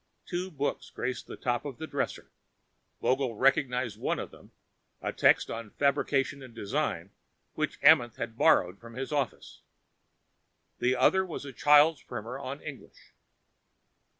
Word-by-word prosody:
Two 180 +1 -3
books 145 -4 -3
graced 125 0 -4
the - - -7
top 120 -1 -1
of 140 -5 -6
the 160 - -5
dresser. - - -4 0.7
Vogel 130 -3 +1
recognized 125 -3 +1
one - - 0
of - - -6
them, - - -17 0.5
a - - -3
text - - +4
on 115 -2 -6
fabrication 140 +1 0
and 125 -3 -12
design 100 - -2 0.4
which - - -2
Amenth 120 -2 +6
had 115 -1 -5
borrowed 90 -4 +3
from 115 0 -12
his 130 +2 -4
office. 140 -5 -3 1.2
The 125 +1 +2
other 190 +9 +4
was 170 -5 -6
a 135 - -8
child's 150 +2 +5
primer 120 +5 -6
of 140 +1 -6
English. 140 -4 -11
130 Hz, 145 wpm, -29 LUFS, 120-145 Hz, 1.2 s, Amenth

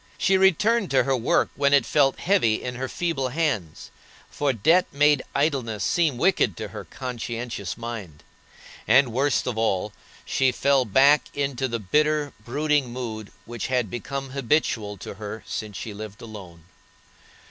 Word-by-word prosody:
She 195 - +2
returned 195 +3 +3
to 135 - +3
her 135 -1 +1
work 120 -2 +1
when 140 0 +3
it 140 - +3
felt 140 -3 +2
heavy 175 - +3
in 125 - -5
her 130 +1 -4
feeble 160 -7 -2
hands, 125 - -2 0.4
for 145 -1 0
debt 160 - +3
made 145 -1 +3
idleness 135 -8 0
seem 160 -7 +1
wicked 170 - +2
to - - -5
her - - -8
conscientious 120 -5 -5
mind. 110 -10 -7 0.6
And, 130 -4 +4
worst 135 +3 +1
of 120 -3 -2
all, 105 -2 0 0.3
she 130 -1 +2
fell 135 +1 +2
back 140 +7 +5
into 135 -2 -1
the 120 -2 -2
bitter, 150 +7 +1
brooding 145 +2 0
mood 110 -4 -6
which 120 -1 -5
had 125 -6 0
become 135 +2 -5
habitual 120 -6 0
to - - -8
her 105 +1 -6
since 105 -3 -5
she 110 - -6
lived 105 +1 -9
alone. 95 -7 -11
130 Hz, 155 wpm, -24 LUFS, 110-145 Hz, 0.6 s, back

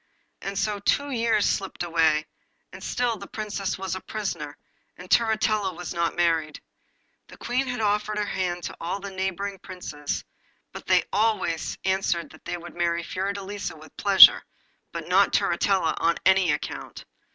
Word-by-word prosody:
And 195 0 -4
so 205 +1 0
two 285 +7 +1
years 230 -4 +2
slipped 195 -2 -1
away, 160 -3 +2 0.5
and - - -10
still 240 -2 0
the 200 0 -9
Princess 210 -2 -3
was 190 0 -4
a 190 - -4
prisoner, 170 -9 -5 0.4
and 180 - -10
Turritella 215 -4 +2
was 175 +1 -6
not 170 -1 0
married. 165 -3 +1 0.7
The - - -14
Queen 255 +3 -1
had 245 -2 -3
offered 210 0 0
her 210 - 0
hand 180 -3 -2
to - - -5
all 175 +4 -2
the 200 0 -7
neighbouring 190 +1 -3
Princes, 150 -6 -5 0.5
but - - -10
they - - +4
always 205 -6 0
answered 190 -3 0
that - - -17
they 175 - -3
would 175 0 -10
marry 170 0 0
Fiordelisa 200 +1 -4
with 155 0 -15
pleasure, 200 -2 +8 0.5
but - - -6
not - - +4
Turritella 190 -5 +2
on 170 0 +2
any 190 -3 +5
account. - - -5
190 Hz, 160 wpm, -25 LUFS, 170-210 Hz, 0.7 s, pleasure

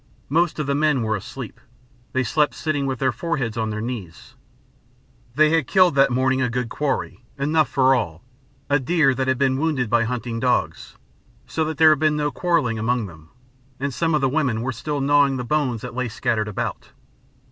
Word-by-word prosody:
Most 170 +3 +1
of 150 - -2
the 140 - 0
men 145 -3 +2
were 110 -1 0
asleep 110 +4 -8 0.5
they 130 - 0
slept 150 +6 +1
sitting 145 -4 -1
with 130 -1 -2
their 130 +1 +1
foreheads 135 -10 -3
on 110 -1 -1
their 110 0 -4
knees. 110 -8 -7 1.0
They 155 +1 +4
had 160 -6 +2
killed 185 -3 +4
that 135 0 +4
morning 130 +1 +1
a 125 - +1
good 125 0 -2
quarry, 125 -6 -3
enough 150 +2 +1
for 135 0 +3
all, 90 -11 -2 0.4
a 145 +1 +2
deer 135 0 +2
that 130 +1 -2
had 130 -1 +1
been 130 0 +1
wounded 140 -7 -1
by 120 -1 +3
hunting 115 -1 -3
dogs; 125 0 -1 0.5
so 160 +5 -2
that 155 -1 -4
there 155 0 +7
had 155 - +2
been 155 0 +2
no 150 -1 -1
quarrelling 150 -12 0
among 120 +1 0
them, 80 -3 -13 0.5
and 140 0 -2
some 165 +2 0
of 150 - +1
the 135 - +3
women 130 -5 0
were 130 - -1
still 145 +4 -4
gnawing 140 -1 +3
the 125 - -3
bones 130 -4 -1
that 125 -1 -7
lay 125 0 -2
scattered 110 -1 -1
about. 105 - -5
130 Hz, 200 wpm, -22 LUFS, 120-150 Hz, 1.0 s, there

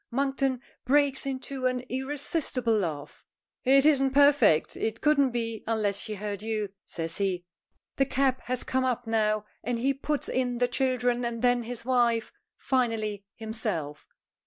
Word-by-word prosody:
Monkton 270 0 0 0.2
breaks 275 0 +2
into 265 -1 -2
an 255 0 -1
irresistible 265 -2 -1
laugh. 155 -8 -3 0.4
"It 275 +2 +5
isn't 270 -3 +3
perfect; 285 - +5
it 220 0 -2
couldn't 290 -3 +4
be 230 -2 -3
unless 210 -3 0
she 215 0 -2
heard 205 -1 -4
you," 215 -2 -2 0.2
says 165 -1 -4
he. 185 -3 -1 0.5
The 270 - +3
cab 265 -1 +1
has 255 0 -2
come 260 0 0
up 245 -1 -1
now, 215 -1 +1 0.2
and 240 +2 -1
he 265 +4 +1
puts 290 +2 -2
in 250 -1 -1
the 245 0 +2
children 245 -1 0
and 235 -1 -3
then 245 0 +4
his 235 0 -6
wife, 240 -3 +2 0.3
finally 225 -6 -1
himself. 215 -10 -4
245 Hz, 150 wpm, -28 LUFS, 215-265 Hz, 0.5 s, It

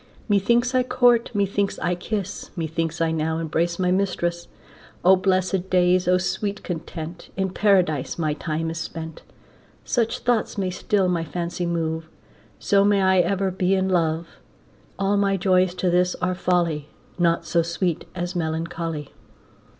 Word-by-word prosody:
Methinks 235 +5 +2
I 255 - +4
court, 245 -2 +3
methinks 200 0 0
I 175 - 0
kiss, 200 +2 -4
Methinks 165 0 -2
I 165 -1 +2
now 160 0 -1
embrace 165 +1 -1
my 180 -1 +1
mistress. 175 -3 -1 0.6
O 190 +1 +8
blessed 185 0 0
days, 180 0 +3
O 180 0 +5
sweet 200 +3 -2
content, 170 0 -6
In 190 -1 0
Paradise 180 -9 +2
my 155 -3 0
time 160 +1 -3
is 165 - -5
spent. 160 -1 -6 0.6
Such 230 -2 0
thoughts 240 -4 0
may 190 -2 -1
still 190 +1 +1
my 175 -2 0
fancy 175 +1 -3
move, 160 -1 -2 0.5
So 200 -1 +3
may 200 -1 +3
I 190 0 +4
ever 190 +2 +1
be 185 +1 +1
in 190 0 0
love. 165 -2 +1 0.7
All 200 +1 +1
my 200 -1 +2
joys 185 -1 +2
to 180 -1 0
this 180 +1 +2
are 180 0 -1
folly, 170 -5 0 0.3
Naught 170 -1 +2
so 170 - +2
sweet 170 0 -2
as 175 +1 -3
melancholy. 160 -2 -3
180 Hz, 150 wpm, -23 LUFS, 165-195 Hz, 0.7 s, O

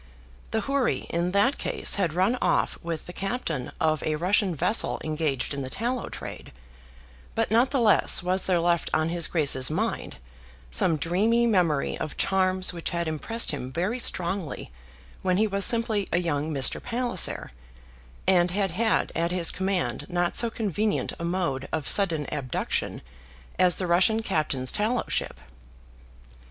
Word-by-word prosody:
The 220 - -1
houri 275 +3 0
in 170 +1 0
that 205 +8 +2
case - - +1
had 180 -6 +1
run 190 +7 +2
off - - +1
with 165 -2 -5
the 175 - -9
captain 195 - -3
of 155 -1 +1
a 155 - -1
Russian 185 +2 +1
vessel 180 +9 0
engaged 155 -4 -1
in 140 - -4
the 130 - -5
tallow 240 - -3
trade; - - -8 0.8
but - - 0
not 235 +4 +4
the 275 - 0
less 215 -5 +3
was 185 +1 0
there 180 -2 +2
left 170 0 +1
on 155 +1 +1
his 170 -1 0
Grace's 140 -5 +2
mind 195 - -3 0.5
some 155 - +2
dreamy 210 +10 +2
memory 175 -10 +1
of 155 - -5
charms 185 -1 +1
which 170 -1 -4
had 170 -1 -2
impressed 190 +9 0
him 130 -3 -5
very 185 - -2
strongly 175 - -2 0.5
when 185 -1 +1
he 215 - +3
was 200 -2 +2
simply 225 -4 +2
a - - +2
young 160 -3 -1
Mr. 135 -3 +2
Palliser, 240 - +1 0.7
and 180 -2 +4
had 195 0 -1
had 220 +5 +1
at 170 +1 0
his 175 -2 +3
command 190 -1 -2
not 175 -1 0
so 235 - +3
convenient 215 -1 -1
a - - -5
mode 170 -6 -2
of 155 -3 -2
sudden 165 -7 +3
abduction 130 - -3 0.6
as 180 -2 +4
the 185 - -3
Russian 185 +6 +3
captain's 150 -9 0
tallow 225 +3 0
ship. - - -1
180 Hz, 160 wpm, -26 LUFS, 160-210 Hz, 0.8 s, not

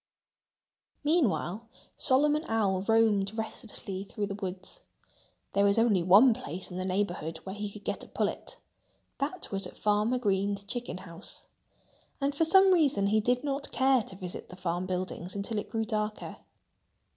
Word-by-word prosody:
Meanwhile, 240 - +1 0.3
Solomon 295 +4 +3
Owl 200 -4 +1
roamed 220 -2 +3
restlessly 220 -3 -5
through 205 +1 -4
the 200 - -4
woods. 195 - -6 0.7
There 200 - +3
was 200 +1 +3
only 225 -5 +4
one 200 +8 +7
place 185 -2 -7
in 180 - -5
the 185 - -2
neighborhood 185 -4 -1
where 190 - -6
he 205 0 -4
could 210 0 -11
get - - -3
a - - -11
pullet. - - -3 0.6
That 295 +6 -3
was 195 0 -2
at - - -14
Farmer 210 +4 +2
Green's 200 -3 0
chicken 240 0 -4
house. 170 +2 -7 0.7
And 280 0 0
for 320 +3 +2
some 380 +3 +6
reason 280 - +3
he 215 +2 +3
did 245 +4 +1
not 280 0 -3
care 265 -1 +4
to 200 - -9
visit 180 -2 -7
the 180 - -9
farm 180 0 -2
buildings 185 0 -4
until 205 +2 -2
it - - -7
grew 225 -1 -1
darker. 215 -1 -3
210 Hz, 160 wpm, -29 LUFS, 190-245 Hz, 0.7 s, one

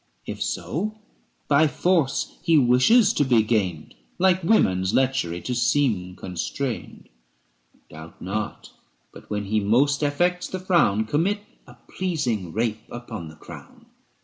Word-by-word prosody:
470 - - -5
If - - -8
so, 215 +6 -3 0.5
by 150 +2 +4
force 165 -3 0
he 165 -2 +3
wishes 135 - +5
to - - +2
be 120 -5 +3
gained, 95 -9 -1 0.2
Like 185 -1 +2
women's 95 - +2
lechery 125 -11 0
to 125 - -3
seem 115 -8 +1
constrained. 105 +9 -5 0.8
Doubt 80 +1 -12
not: 105 +4 -5 0.4
but, - - -14
when 105 -1 -3
he 105 +2 +1
most 130 +9 +2
affects 175 +5 0
the 185 - -5
frown, 170 - +2
Commit 175 - 0 0.3
a 120 - -14
pleasing 125 - -2
rape 110 +1 -1
upon 120 -7 -7
the 80 - -12
crown. - - -13
125 Hz, 135 wpm, -24 LUFS, 105-165 Hz, 0.8 s, wishes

